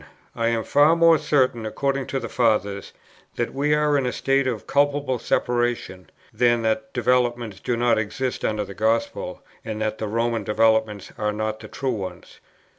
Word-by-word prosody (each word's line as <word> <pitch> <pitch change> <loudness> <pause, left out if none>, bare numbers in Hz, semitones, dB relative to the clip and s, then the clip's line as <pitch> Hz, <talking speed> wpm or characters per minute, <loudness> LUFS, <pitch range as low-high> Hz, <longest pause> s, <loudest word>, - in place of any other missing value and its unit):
I 115 - 0
am 115 -1 0
far 145 +6 +4
more 165 -1 +5
certain 130 -6 +1
(according 135 +4 -2
to 135 - -2
the 115 - -5
Fathers) 105 -5 0 0.4
that 120 - -2
we 145 +2 +1
are 150 -1 +2
in 130 - -1
a - - 0
state 135 +1 +1
of 115 -6 -3
culpable 145 -3 +1
separation, 120 -6 -1 0.2
than 120 -1 +2
that 110 0 -1
developments 120 -3 0
do 120 - -2
not 120 -1 +2
exist 125 +4 -3
under 105 -1 -1
the 100 - -9
Gospel, 110 +3 -1 0.2
and 110 -1 -5
that 110 0 -2
the 110 - -2
Roman 115 +1 -1
developments 110 -1 +1
are 105 0 0
not 110 +1 -3
the - - -10
true 135 -2 -3
ones. 95 -4 -7
115 Hz, 175 wpm, -23 LUFS, 110-135 Hz, 0.4 s, more